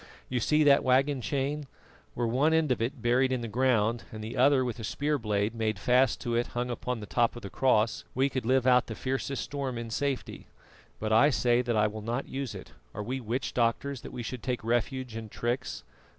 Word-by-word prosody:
You 125 - 0
see 150 +6 +3
that 140 -1 +5
waggon 135 +1 +2
chain? 140 +3 -2 0.5
Were 120 - 0
one 135 +8 +2
end 160 -4 +2
of 120 - 0
it 120 +1 -3
buried 125 +2 +3
in 130 -2 0
the 115 - -4
ground 120 -1 +1
and 110 -1 -7
the 110 - -6
other 130 0 +4
with 120 -1 -4
a - - -6
spear 145 +6 -1
blade 105 -1 0
made 110 -3 -1
fast 125 +5 +3
to 120 - -2
it 120 +1 +1
hung 125 +1 -1
to 125 +1 -3
the 110 -3 -7
top 120 +2 +1
of 120 - -9
the 100 - -7
cross, 115 -4 +2
we 135 +2 +3
could 130 -2 -3
live 130 +2 +2
out 125 -1 +4
the 110 - -5
fiercest 135 +2 -2
storm 135 -4 -4
in 115 -1 -5
safety. 140 +3 -3 0.5
But 110 0 -1
I 140 +7 +6
say 125 -3 +2
that 120 -2 -1
I 105 - +4
will 105 +1 -3
not 120 +5 -3
use 135 -2 -4
it. - - -10 0.2
Are 105 - -3
we 130 +4 -3
witch 125 +3 -3
doctors 120 +2 0
that - - -9
we 120 - -5
should 125 +1 -5
take 125 -1 -3
refuge 120 +1 -1
in 110 -1 -6
tricks? 120 +5 -3
125 Hz, 225 wpm, -29 LUFS, 115-135 Hz, 0.5 s, I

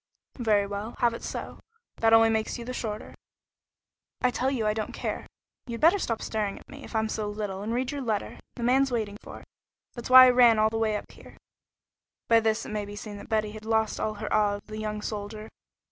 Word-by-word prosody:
"Very 210 -4 +2
well, 205 +3 -5
have 235 -1 +2
it 230 - -7
so. - - -6 0.4
That 225 0 +3
only 225 0 +6
makes 220 +2 -1
you 235 - -7
the 255 - -5
shorter." 215 -4 -5 1.1
"I 250 - +2
tell 260 +2 0
you 250 -5 -1
I 210 - +2
don't 215 0 -4
care. - - -4 0.4
You'd 235 -1 -5
better 340 +6 +5
stop 230 -10 -2
staring 210 -2 -2
at - - -15
me, 280 0 -11
if - - -10
I'm 220 0 +1
so 215 -1 -3
little, 205 -2 -4
and 215 +2 -3
read 250 +2 -1
your 285 -1 -4
letter. 220 -5 -3 0.2
The 240 - -6
man's 265 +2 +3
waiting 215 -4 -2
for - - -10
it. - - -18 0.5
That's 240 0 -7
why 255 0 +11
I 255 - +6
ran 240 -2 +6
all 215 0 +3
the 225 - -2
way 220 -1 +1
up - - -10
here." - - -15 0.9
By 230 0 +6
this 220 0 0
it - - -7
may 210 -1 -3
be 205 0 -9
seen 205 0 -7
that - - -11
Betty 215 -2 0
had 215 0 -10
lost 220 -1 0
all 215 0 -2
her 210 +1 -4
awe 205 -1 +3
of 205 - -10
the 215 0 -7
young 210 -1 -4
soldier. 215 +1 -5
220 Hz, 235 wpm, -27 LUFS, 210-235 Hz, 1.1 s, why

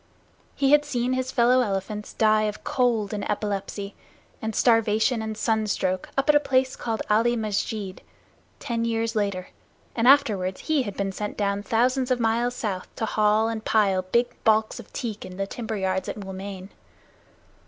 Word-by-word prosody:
He 275 -1 +2
had 295 0 +6
seen 255 -3 -1
his 260 0 -2
fellow 250 +1 +4
elephants 210 -1 -3
die 215 -1 +3
of 210 0 -4
cold 230 -5 0
and 205 - -3
epilepsy 200 -1 -3 0.5
and 220 -1 -3
starvation 225 0 +3
and 220 -1 -4
sunstroke 210 -5 0
up 275 - +1
at 300 - +6
a 295 - +6
place 260 -2 +1
called 225 -2 -3
Ali 230 +3 +3
Musjid, 210 -2 -3 0.6
ten 230 -1 -2
years 230 0 -1
later; 200 -3 -1 0.5
and 235 +1 +2
afterward 210 -10 +4
he 310 -3 0
had 205 -6 -5
been 195 -1 -1
sent 210 +2 -5
down 200 -1 0
thousands 250 +4 +1
of 255 -1 +1
miles 235 +2 +1
south 195 -6 -3
to 225 - -2
haul 215 +1 +2
and 225 -1 -3
pile 200 -5 +2
big 235 +7 +1
balks 220 +1 +2
of 235 - -12
teak 225 -5 -5
in 180 - -9
the 195 - -1
timberyards 195 -4 -3
at - - -5
Moulmein. 195 -1 -7
220 Hz, 165 wpm, -25 LUFS, 200-240 Hz, 0.6 s, had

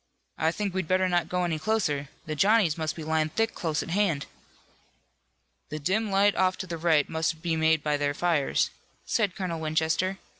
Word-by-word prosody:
"I 160 +1 +2
think 200 +1 -3
we'd 190 -3 -2
better 185 +1 +2
not 175 -1 0
go 180 0 0
any 165 -3 -1
closer. 150 -8 0 0.2
The 155 - -3
Johnnies 195 -1 +4
must 160 -2 -3
be 160 - -7
lying 155 0 0
thick 225 +7 0
close 160 -3 -2
at - - -7
hand." 175 -7 +1 1.4
"The 155 - -4
dim 195 +9 0
light 200 +1 +4
off 185 0 +2
to 185 - -5
the 170 -2 -5
right 160 -3 +3
must 160 0 -2
be 165 -2 0
made 160 -1 +2
by 150 -1 +1
their 145 0 -1
fires," 160 -4 +1 0.3
said 205 -6 0
Colonel 180 -4 -3
Winchester. 160 +4 0
165 Hz, 190 wpm, -27 LUFS, 155-185 Hz, 1.4 s, Johnnies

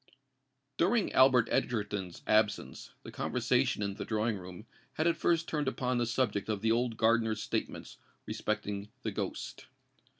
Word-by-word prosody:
During 200 +5 +2
Albert 130 -3 +6
Egerton's 100 -6 -2
absence, 110 -1 +1
the - - -9
conversation 105 - 0
in 100 -1 -2
the - - -5
drawing 110 0 0
room 90 +2 -9 0.3
had 155 - -1
at 170 - +3
first 170 -1 +1
turned 150 -3 -1
upon 125 -1 0
the 120 - +1
subject 110 -4 0
of 105 -2 -1
the 110 - +3
old 120 -1 +1
gardener's 110 -1 +2
statements - - -4 0.3
respecting 100 0 -3
the 110 - -2
ghost. - - -5
115 Hz, 145 wpm, -31 LUFS, 105-125 Hz, 0.3 s, Albert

